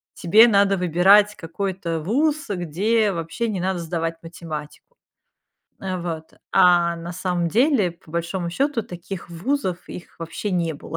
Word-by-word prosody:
тебе 215 Hz, +7 st, +6 dB
надо 200 Hz, -2 st, +3 dB
выбирать 190 Hz, +4 st, +4 dB
какой-то 170 Hz, -1 st, -4 dB
ВУЗ, 290 Hz, -, 0 dB
где 200 Hz, +5 st, +1 dB
вообще 175 Hz, +7 st, -3 dB
не 195 Hz, -4 st, -2 dB
надо 185 Hz, -1 st, -1 dB
сдавать 165 Hz, 0 st, -3 dB
математику. 155 Hz, -3 st, -8 dB, 1.0 s
А, 185 Hz, -1 st, -3 dB
вот. 165 Hz, -2 st, -5 dB, 0.2 s
А, 175 Hz, -1 st, +4 dB
на 170 Hz, +1 st, -7 dB
самом 180 Hz, -1 st, -1 dB
деле, 235 Hz, -, +3 dB
по 170 Hz, -2 st, -21 dB
большому 170 Hz, +1 st, -3 dB
счету, 270 Hz, +4 st, 0 dB
таких 175 Hz, 0 st, -8 dB
ВУЗов, 185 Hz, +2 st, -1 dB
их, 175 Hz, -, -10 dB
вообще 165 Hz, +5 st, -5 dB
не 170 Hz, -3 st, 0 dB
было. 150 Hz, +3 st, -7 dB
180 Hz, 140 wpm, -22 LUFS, 170-200 Hz, 1.0 s, тебе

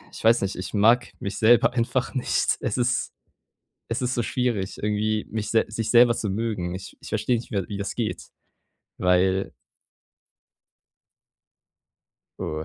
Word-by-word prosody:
Ich -, -, -9 dB
weiß 115 Hz, +1 st, +5 dB
nicht, 100 Hz, 0 st, -2 dB
ich 90 Hz, -, -6 dB
mag 115 Hz, +4 st, +4 dB
mich 100 Hz, -, -4 dB
selber 120 Hz, +2 st, +5 dB
einfach 125 Hz, +1 st, -1 dB
nicht. 130 Hz, -, +1 dB
Es -, -, -2 dB
ist 125 Hz, 0 st, 0 dB, 0.8 s
es 115 Hz, +3 st, -2 dB
ist 125 Hz, 0 st, 0 dB
so 120 Hz, -, 0 dB
schwierig 115 Hz, -6 st, -1 dB
irgendwie, 105 Hz, +1 st, 0 dB
mich 110 Hz, -1 st, -3 dB
sel 115 Hz, -, +3 dB
sich 110 Hz, 0 st, -3 dB
selber 120 Hz, 0 st, +6 dB
zu 105 Hz, -, -3 dB
mögen. 95 Hz, -4 st, -2 dB
Ich 95 Hz, -, -9 dB
ich -, -, -10 dB
versteh 125 Hz, -, 0 dB
nicht 115 Hz, -, -7 dB
mehr, 100 Hz, -5 st, -2 dB
wie 100 Hz, -, -5 dB
das 100 Hz, -1 st, -4 dB
geht, 115 Hz, -3 st, -3 dB, 0.8 s
weil 95 Hz, +1 st, +2 dB, 2.9 s
Oh, 75 Hz, 0 st, -3 dB
110 Hz, 150 wpm, -24 LUFS, 100-120 Hz, 2.9 s, selber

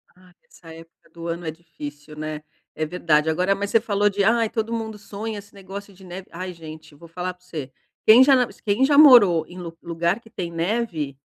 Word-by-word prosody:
Ai 180 Hz, 0 st, -21 dB
essa 165 Hz, -2 st, -14 dB
época 165 Hz, +1 st, -16 dB
do 170 Hz, 0 st, -8 dB
ano 170 Hz, 0 st, -4 dB
é 160 Hz, -, -2 dB
difícil, 150 Hz, -2 st, -10 dB
né. 155 Hz, 0 st, -5 dB, 0.3 s
É 155 Hz, -, -1 dB
verdade, 155 Hz, -2 st, +1 dB
agora 180 Hz, +5 st, +2 dB
mas 200 Hz, 0 st, -3 dB
você 225 Hz, -, +3 dB
falou 205 Hz, -2 st, +1 dB
de 200 Hz, 0 st, 0 dB
ai 225 Hz, +1 st, +3 dB
todo 225 Hz, 0 st, -3 dB
mundo 220 Hz, -2 st, -4 dB
sonha 210 Hz, +1 st, -6 dB
esse 200 Hz, +1 st, -16 dB
negócio 200 Hz, +1 st, -9 dB
de 190 Hz, 0 st, -16 dB
neve, 185 Hz, +1 st, -8 dB
ai 180 Hz, +1 st, -6 dB
gente, 155 Hz, -2 st, -12 dB
vou 170 Hz, +3 st, -14 dB
falar 180 Hz, +2 st, -4 dB
pra 180 Hz, 0 st, -31 dB
você, 150 Hz, -7 st, -6 dB, 0.4 s
quem 230 Hz, +4 st, +9 dB
já 275 Hz, +1 st, +5 dB
na 250 Hz, -1 st, +2 dB, 0.2 s
quem 215 Hz, +6 st, +2 dB
já 285 Hz, 0 st, +3 dB
morou 205 Hz, -, +8 dB
em 180 Hz, -, -12 dB
lu 170 Hz, -2 st, -8 dB
lugar 170 Hz, +4 st, -1 dB
que 225 Hz, -, -18 dB
tem 175 Hz, -5 st, -5 dB
neve, 165 Hz, -, -2 dB
180 Hz, 220 wpm, -23 LUFS, 165-205 Hz, 0.4 s, quem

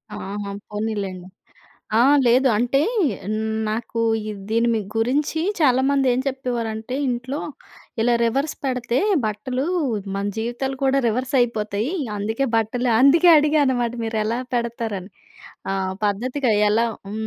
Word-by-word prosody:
ఆహా! 200 Hz, +1 st, -5 dB, 0.2 s
పోనీలెండి. 205 Hz, -4 st, -4 dB, 0.7 s
ఆ! -, -, +5 dB, 0.2 s
లేదు 255 Hz, +3 st, +4 dB
అంటే, 245 Hz, +4 st, +2 dB, 0.9 s
నాకు 230 Hz, +1 st, -3 dB, 0.3 s
ఇద్ 205 Hz, -2 st, -7 dB
దీని 230 Hz, +1 st, +2 dB
వి 220 Hz, -, 0 dB, 0.2 s
గురించి 280 Hz, +7 st, 0 dB, 0.2 s
చాలామంది 270 Hz, 0 st, +3 dB
ఏం 250 Hz, -, +1 dB
చెప్పేవారంటే 245 Hz, -3 st, -3 dB
ఇంట్లో, 255 Hz, +4 st, -3 dB, 0.6 s
ఇలా 240 Hz, +1 st, +3 dB
రివర్స్ 275 Hz, +6 st, 0 dB
పెడతే 250 Hz, -2 st, 0 dB, 0.3 s
బట్టలు 220 Hz, +5 st, -2 dB, 0.5 s
మన 200 Hz, -, -2 dB
జీవితాలు 240 Hz, +4 st, -3 dB
కూడా 270 Hz, +1 st, +3 dB
రివర్సయిపోతయి. 235 Hz, -, 0 dB, 0.2 s
అందుకే 220 Hz, +6 st, -1 dB
బట్టలు 240 Hz, +3 st, 0 dB
అందుకే 320 Hz, +6 st, +6 dB
అడిగా 300 Hz, 0 st, +3 dB
అనమాట 245 Hz, -2 st, 0 dB
మీరెలా 225 Hz, +1 st, -1 dB, 0.2 s
పెడతారని. 225 Hz, -5 st, -3 dB, 0.6 s
ఆ! -, -, 0 dB, 0.3 s
పద్ధతిగా 250 Hz, +5 st, 0 dB, 0.2 s
ఎలా 230 Hz, +2 st, +3 dB, 0.2 s
హ్మ్. 220 Hz, +1 st, -4 dB
240 Hz, 115 wpm, -22 LUFS, 220-260 Hz, 0.9 s, అందుకే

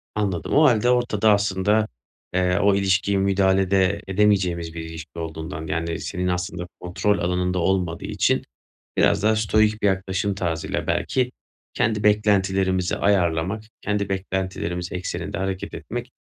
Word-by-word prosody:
Anladım. 100 Hz, -5 st, -1 dB
O 150 Hz, -, +6 dB
hâlde 120 Hz, -3 st, +4 dB
ortada 120 Hz, -4 st, +3 dB
aslında, 100 Hz, +1 st, +1 dB, 0.5 s
eee, 90 Hz, 0 st, +2 dB
o 100 Hz, -1 st, +4 dB
ilişkiyi 100 Hz, 0 st, +2 dB
müdahale 95 Hz, -1 st, +2 dB
de 100 Hz, +1 st, +2 dB
edemeyeceğimiz 95 Hz, -4 st, +1 dB
bir 85 Hz, -, -5 dB
ilişki 80 Hz, +1 st, -8 dB
olduğundan, 80 Hz, -1 st, -5 dB
yani 85 Hz, +1 st, -2 dB
senin 90 Hz, -1 st, -3 dB
aslında 90 Hz, 0 st, -2 dB
kontrol 95 Hz, +3 st, 0 dB
alanında 90 Hz, +1 st, 0 dB
olmadığı 90 Hz, -1 st, 0 dB
için -, -, +1 dB, 0.6 s
biraz 100 Hz, -1 st, +3 dB
da 110 Hz, +1 st, +4 dB
stoic 110 Hz, 0 st, +2 dB
bir 105 Hz, -, +3 dB
yaklaşım 95 Hz, +1 st, -1 dB
tarzıyla 85 Hz, -4 st, -2 dB
belki 125 Hz, -1 st, 0 dB, 0.4 s
kendi 105 Hz, -2 st, 0 dB
beklentilerimizi 95 Hz, -3 st, +2 dB
ayarlamak, 95 Hz, +1 st, +1 dB, 0.2 s
kendi 105 Hz, -1 st, -1 dB
beklentilerimiz 95 Hz, -2 st, -3 dB
ekseninde 90 Hz, 0 st, -4 dB
hareket 95 Hz, 0 st, -3 dB
etmek, -, -, -6 dB
95 Hz, 135 wpm, -23 LUFS, 90-105 Hz, 0.6 s, O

